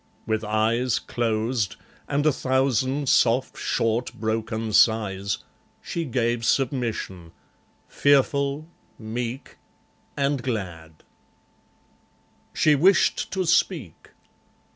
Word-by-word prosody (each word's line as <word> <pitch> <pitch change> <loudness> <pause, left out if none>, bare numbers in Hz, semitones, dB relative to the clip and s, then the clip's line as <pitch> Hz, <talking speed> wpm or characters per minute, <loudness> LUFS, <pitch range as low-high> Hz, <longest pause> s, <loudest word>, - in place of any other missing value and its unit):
With 110 0 -1
eyes 110 +3 +1
Closed, 115 -2 -1 0.3
and 145 +1 0
a 155 - +5
thousand 130 +1 0
soft 125 +1 +3
short 115 +2 -1
broken 110 0 -2
sighs, 100 -3 +2 0.4
She 170 -1 -4
gave 120 -3 -1
submission; 115 - -1 0.5
fearful, 140 +1 +2 0.3
meek, 120 +4 -5 0.6
and 140 -1 0
glad.... 90 -10 -5 1.5
She 155 - +3
wished 180 +7 +3
to 190 -1 0
speak. 165 - 0
120 Hz, 85 wpm, -24 LUFS, 110-140 Hz, 1.5 s, a